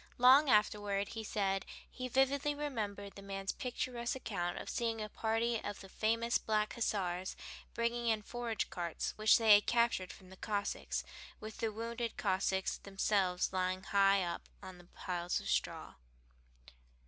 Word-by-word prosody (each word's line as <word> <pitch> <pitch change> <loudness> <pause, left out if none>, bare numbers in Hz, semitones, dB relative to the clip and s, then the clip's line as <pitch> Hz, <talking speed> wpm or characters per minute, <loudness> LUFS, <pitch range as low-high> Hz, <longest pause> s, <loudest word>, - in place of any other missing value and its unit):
Long 265 +4 +7
afterward 205 -2 +2
he 225 -1 -5
said 195 -2 0 0.2
he 255 0 -6
vividly 270 +3 +2
remembered 210 -9 -4
the 200 - -10
man's 195 0 -3
picturesque 245 -1 -3
account 185 -9 -3
of - - -6
seeing 230 -2 -1
a 215 0 -4
party 225 +1 0
of 205 -1 -5
the 195 - -11
famous 230 +3 +1
Black 215 -1 0
Hussars 190 -5 -1 0.4
bringing 235 0 0
in 220 -2 +2
forage 235 0 -3
carts 170 -3 -3
which 215 0 +6
they 225 -2 +7
had 205 0 +5
captured 235 -6 +2
from 185 -1 -14
the 190 - -12
Cossacks, 205 0 -2 0.4
with 215 0 -8
the 225 - 0
wounded 230 +2 -4
Cossacks 190 0 0
themselves 195 -2 0
lying 185 0 0
high 195 -1 +4
up 170 -1 -4
on 185 -1 -9
the 175 - -15
piles 175 0 -3
of - - -8
straw. - - -1
210 Hz, 155 wpm, -35 LUFS, 195-235 Hz, 0.4 s, Long